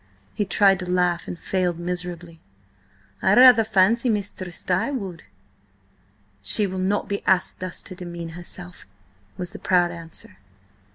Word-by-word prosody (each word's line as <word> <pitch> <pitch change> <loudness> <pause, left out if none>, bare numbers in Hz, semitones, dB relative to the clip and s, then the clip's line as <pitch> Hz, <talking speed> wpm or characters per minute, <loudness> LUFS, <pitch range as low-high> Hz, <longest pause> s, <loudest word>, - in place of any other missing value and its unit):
He 205 - -1
tried 195 -1 +4
to 180 -1 -5
laugh 180 -1 +1
and 175 - -5
failed 180 -1 -1
miserably. 175 -1 -5 0.8
"I - - +4
rather 250 -2 +8
fancy 220 +4 +3
Mistress 195 -4 -4
Di 185 +7 0
would." 195 - -5 1.2
"She 155 - +1
will 190 -1 -4
not 195 +2 0
be 200 0 -3
asked 185 -1 +2
thus 185 -2 -6
to 185 - -9
demean 175 -2 -7
herself," 175 - -8 0.5
was 180 -1 -3
the - - -9
proud 175 -2 +2
answer. 165 - -7
180 Hz, 140 wpm, -23 LUFS, 175-195 Hz, 1.2 s, rather